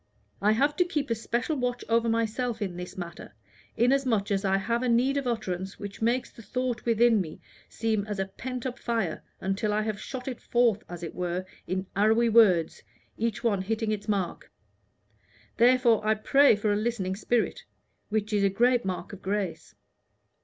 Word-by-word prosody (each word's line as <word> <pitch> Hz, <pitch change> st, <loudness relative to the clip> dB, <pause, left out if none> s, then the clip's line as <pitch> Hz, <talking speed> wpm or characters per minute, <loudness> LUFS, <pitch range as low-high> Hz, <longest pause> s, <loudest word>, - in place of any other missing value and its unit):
I 210 Hz, +2 st, +4 dB
have 285 Hz, +6 st, +2 dB
to 360 Hz, -, +5 dB
keep 295 Hz, -7 st, -2 dB
a -, -, +5 dB
special 235 Hz, +6 st, -2 dB
watch 245 Hz, -2 st, -2 dB
over 230 Hz, 0 st, +2 dB
myself 230 Hz, +1 st, -1 dB
in 190 Hz, -5 st, -3 dB
this 180 Hz, +1 st, -7 dB
matter, 170 Hz, -, -8 dB, 0.4 s
inasmuch 240 Hz, -5 st, +2 dB
as 195 Hz, 0 st, +1 dB
I 195 Hz, -1 st, +2 dB
have 235 Hz, +5 st, -1 dB
need 250 Hz, +4 st, +3 dB
of 280 Hz, -2 st, -1 dB
utterance 190 Hz, -5 st, -3 dB
which 205 Hz, +1 st, -8 dB
makes 240 Hz, +3 st, +1 dB
the -, -, -13 dB
thought 250 Hz, +1 st, -3 dB
within 230 Hz, -2 st, +4 dB
me 160 Hz, -4 st, -7 dB, 0.3 s
seem 220 Hz, -3 st, -1 dB
as 210 Hz, -1 st, -3 dB
a 195 Hz, -, 0 dB
pent 250 Hz, +5 st, -6 dB
up 250 Hz, -1 st, -4 dB
fire, 225 Hz, -9 st, -1 dB, 0.2 s
until 195 Hz, +2 st, -1 dB
I 210 Hz, +1 st, +1 dB
have 215 Hz, -1 st, -3 dB
shot 260 Hz, -1 st, -6 dB
it 250 Hz, -3 st, -5 dB
forth, 235 Hz, -4 st, +2 dB
as 175 Hz, 0 st, -7 dB
it 165 Hz, -, -5 dB
were, 180 Hz, +1 st, -2 dB, 0.2 s
in 185 Hz, +1 st, -2 dB
arrowy 220 Hz, +4 st, +4 dB
words, 195 Hz, -8 st, +4 dB, 0.3 s
each 230 Hz, +1 st, -2 dB
one 205 Hz, -5 st, +2 dB
hitting 220 Hz, +2 st, -1 dB
its 210 Hz, 0 st, -3 dB
mark. 195 Hz, -4 st, -2 dB, 1.1 s
Therefore 240 Hz, -2 st, +4 dB
I 215 Hz, +1 st, +3 dB
pray 275 Hz, +4 st, +5 dB
for 205 Hz, 0 st, 0 dB
a -, -, +1 dB
listening 210 Hz, -4 st, -1 dB
spirit, 230 Hz, +3 st, -1 dB, 0.4 s
which 215 Hz, 0 st, -1 dB
is 205 Hz, -1 st, +2 dB
a 200 Hz, -, +4 dB
great 245 Hz, +5 st, +3 dB
mark 185 Hz, 0 st, -4 dB
of 200 Hz, -, -9 dB
grace. 190 Hz, -5 st, -3 dB
220 Hz, 180 wpm, -27 LUFS, 195-240 Hz, 1.1 s, to